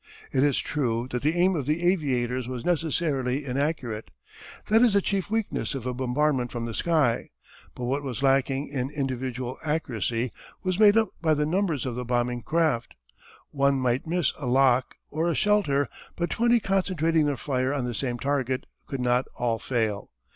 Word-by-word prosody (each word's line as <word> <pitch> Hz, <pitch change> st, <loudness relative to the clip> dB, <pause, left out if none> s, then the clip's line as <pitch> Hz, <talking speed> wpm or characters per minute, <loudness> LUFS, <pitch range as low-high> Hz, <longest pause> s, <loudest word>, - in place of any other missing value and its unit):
It 130 Hz, -, +2 dB
is 145 Hz, -3 st, +3 dB
true 120 Hz, -5 st, -1 dB
that 125 Hz, -, -2 dB
the 155 Hz, +3 st, +1 dB
aim 185 Hz, +1 st, +4 dB
of 140 Hz, -5 st, -3 dB
the 155 Hz, +3 st, 0 dB
aviators 130 Hz, -8 st, +1 dB
was 125 Hz, -2 st, -5 dB
necessarily 150 Hz, -5 st, 0 dB
inaccurate. 130 Hz, -5 st, -2 dB, 0.6 s
That 220 Hz, +2 st, +4 dB
is 240 Hz, -4 st, +5 dB
the 200 Hz, -, +5 dB
chief 195 Hz, 0 st, -1 dB
weakness 220 Hz, -8 st, -1 dB
of 130 Hz, -3 st, -5 dB
a 125 Hz, -, -1 dB
bombardment 130 Hz, 0 st, 0 dB
from 120 Hz, -1 st, -3 dB
the 115 Hz, -, -4 dB
sky. 150 Hz, -5 st, +1 dB, 0.5 s
But 125 Hz, -, -6 dB
what 135 Hz, +4 st, 0 dB
was 135 Hz, -1 st, -4 dB
lacking 135 Hz, +1 st, +2 dB
in 135 Hz, -2 st, -2 dB
individual 130 Hz, -3 st, -3 dB
accuracy 125 Hz, -, -1 dB, 0.3 s
was 185 Hz, 0 st, -1 dB
made 210 Hz, 0 st, +7 dB
up 220 Hz, -3 st, +3 dB
by 160 Hz, -2 st, +3 dB
the 150 Hz, 0 st, +1 dB
numbers 170 Hz, -4 st, 0 dB
of 130 Hz, -, -2 dB
the 125 Hz, +1 st, -4 dB
bombing 120 Hz, 0 st, 0 dB
craft. 155 Hz, -5 st, 0 dB, 0.6 s
One 140 Hz, -1 st, +2 dB
might 125 Hz, +3 st, 0 dB
miss 175 Hz, -1 st, +1 dB
a 140 Hz, -, -4 dB
lock 130 Hz, 0 st, +3 dB, 0.2 s
or 160 Hz, +3 st, 0 dB
a 165 Hz, -, 0 dB
shelter, 195 Hz, -10 st, +2 dB, 0.3 s
but 170 Hz, 0 st, -2 dB
twenty 235 Hz, +1 st, +3 dB
concentrating 165 Hz, -6 st, +1 dB
their 145 Hz, -2 st, -1 dB
fire 130 Hz, 0 st, -1 dB
on 140 Hz, -3 st, -1 dB
the 120 Hz, -, -3 dB
same 120 Hz, 0 st, -2 dB
target 130 Hz, -1 st, -1 dB, 0.2 s
could 135 Hz, -2 st, -4 dB
not 125 Hz, +1 st, +2 dB
all 115 Hz, -2 st, 0 dB
fail. 110 Hz, -5 st, -1 dB
135 Hz, 180 wpm, -26 LUFS, 125-160 Hz, 0.6 s, made